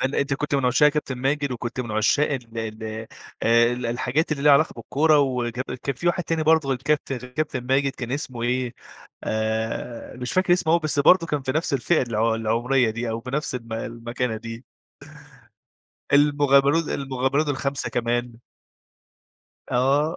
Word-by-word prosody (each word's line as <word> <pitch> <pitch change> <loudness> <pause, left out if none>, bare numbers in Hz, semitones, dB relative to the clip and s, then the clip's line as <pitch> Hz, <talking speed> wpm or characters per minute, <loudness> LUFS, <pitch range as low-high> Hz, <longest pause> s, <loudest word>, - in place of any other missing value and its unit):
هل 135 +1 -1
أنت 140 -1 0
كنت 150 +1 -2
من 135 -2 +1
عشاق 125 +4 +5
كابتن 150 -3 -2
ماجد، 140 +1 0
وكنت 120 +1 -4
من 120 - -5
عشاق 110 +8 +2
ال 115 -4 -5
ال 110 -1 -5 0.6
آآ، 115 +1 +4
ال 125 0 -3
الحاجات 125 +7 0
اللي 140 -2 -3
ليها 150 - +6
علاقة 150 +3 +4
بالكورة، 150 +6 +2
وكب 125 -3 0
وكان 130 +2 -3
في 175 +8 -5
واحد 175 +1 +2
تاني 165 -1 -1
برضه 160 -2 +3
غير 130 -2 0
الكابتن 140 -2 -1
كابتن 130 +2 -3
ماجد، 135 +1 +2
كان 125 0 -6
اسمه 130 -4 -4
إيه 125 0 -1 0.5
آآ، 110 +2 -3
مش 125 0 -4
فاكر 185 -1 +3
اسمه 170 -3 +2
أوي، 170 - +4
بس 150 -1 -1
برضه 165 +4 +5
كان 150 -3 -2
في 130 - -2
نَفس 155 +2 -1
الفئة 140 +5 +2
الع 115 -2 0
العمرية 115 +2 +1
دي، 115 +1 -3
أو 115 +1 -3
في 125 - -8
نَفس 145 -1 -2
الم 115 -2 -6
المكانة 115 +1 -3
دي. 115 +2 -8 1.5
المغامرون 145 +1 +4
ال - - -7
المغامرون 135 +2 -1
الخمسة 140 0 -2
كمان. 120 0 -1 1.4
آه. 140 +6 +2
130 Hz, 175 wpm, -24 LUFS, 120-145 Hz, 1.5 s, ليها